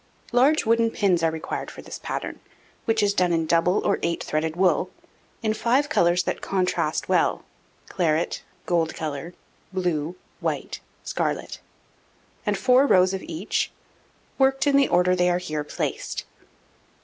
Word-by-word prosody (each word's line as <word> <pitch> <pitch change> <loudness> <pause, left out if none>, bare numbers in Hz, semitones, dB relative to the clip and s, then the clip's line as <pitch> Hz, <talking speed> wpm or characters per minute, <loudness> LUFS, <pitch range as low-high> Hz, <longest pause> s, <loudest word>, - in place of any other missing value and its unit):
Large 265 +5 +4
wooden 230 0 +3
pins 190 -6 +1
are 165 - +3
required 160 0 -4
for - - -11
this - - -8
pattern, - - -4 0.5
which 225 -1 +2
is 200 0 +3
done 180 -2 +2
in 165 -1 +1
double 170 +3 +2
or - - +2
eight 170 0 -1
threaded 155 +1 -1
wool, 185 0 +2 0.5
in 215 -1 +2
5 255 +6 +1
colours 175 - +3
that - - -3
contrast 185 -2 0
well - - +1 0.4
claret, 165 -2 0 0.2
gold 165 -2 +1
colour, 155 +2 -5 0.4
blue, 175 -3 -1 0.2
white, - - -3 0.2
scarlet; - - -2 0.9
and 205 -1 +1
4 255 +7 +4
rows 185 -3 +5
of 190 - -3
each, 170 +5 -2 0.7
worked 270 +1 +3
in 285 -1 +3
the 275 -1 +5
order 180 +1 +3
they 180 0 +3
are 175 - +2
here 155 -4 -3
placed. 150 - -4
180 Hz, 150 wpm, -24 LUFS, 165-220 Hz, 0.9 s, rows